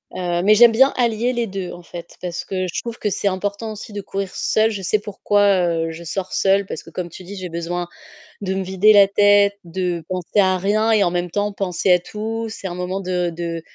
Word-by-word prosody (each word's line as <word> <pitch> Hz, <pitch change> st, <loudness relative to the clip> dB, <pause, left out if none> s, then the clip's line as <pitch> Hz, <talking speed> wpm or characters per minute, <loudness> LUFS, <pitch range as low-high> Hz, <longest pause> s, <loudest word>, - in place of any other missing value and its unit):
heu, 175 Hz, -1 st, -1 dB
mais 210 Hz, +2 st, +6 dB
j'aime 235 Hz, +2 st, +8 dB
bien 265 Hz, +5 st, +4 dB
allier 240 Hz, 0 st, +1 dB
les 240 Hz, -1 st, -1 dB
2, 190 Hz, -2 st, -5 dB
en 175 Hz, -, -11 dB
fait, 170 Hz, 0 st, -10 dB
parce 175 Hz, -1 st, -4 dB
que 185 Hz, -1 st, -2 dB
je -, -, -2 dB
trouve 235 Hz, -1 st, -6 dB
que 210 Hz, -, -1 dB
c'est 200 Hz, -, -1 dB
important 205 Hz, +3 st, -2 dB
aussi 215 Hz, +2 st, -9 dB
de 205 Hz, -, -4 dB
courir 195 Hz, 0 st, -4 dB
seule. 220 Hz, +1 st, +1 dB
Je 205 Hz, -3 st, -5 dB
sais 200 Hz, +3 st, +1 dB
pourquoi, 205 Hz, 0 st, 0 dB, 0.3 s
heu, 165 Hz, -1 st, -1 dB
je 165 Hz, +1 st, -9 dB
sors 185 Hz, +3 st, -4 dB
seule 195 Hz, +1 st, +2 dB
parce 160 Hz, -, -7 dB
que, -, -, -13 dB
comme 175 Hz, +1 st, -5 dB
tu 175 Hz, -, -11 dB
dis, 195 Hz, +3 st, -9 dB
j'ai 185 Hz, -2 st, -6 dB
besoin 170 Hz, +1 st, -3 dB, 0.5 s
de 190 Hz, -1 st, -2 dB
me 190 Hz, 0 st, -2 dB
vider 190 Hz, +3 st, +4 dB
la 200 Hz, -1 st, +7 dB
tête, 205 Hz, 0 st, +4 dB
de 175 Hz, -1 st, -3 dB
penser 185 Hz, +2 st, -1 dB
à 185 Hz, -1 st, +4 dB
rien 215 Hz, +4 st, +1 dB
et 215 Hz, -2 st, +4 dB
en 175 Hz, -, +1 dB
même 175 Hz, 0 st, -2 dB
temps 205 Hz, +2 st, -1 dB
penser 190 Hz, -1 st, 0 dB
à 180 Hz, -, +4 dB
tout. 220 Hz, +5 st, -4 dB
C'est 205 Hz, -3 st, -6 dB
un 175 Hz, -, -5 dB
moment 180 Hz, +2 st, -3 dB
de 180 Hz, -2 st, -1 dB
de 165 Hz, -1 st, -4 dB
190 Hz, 240 wpm, -20 LUFS, 180-210 Hz, 0.5 s, j'aime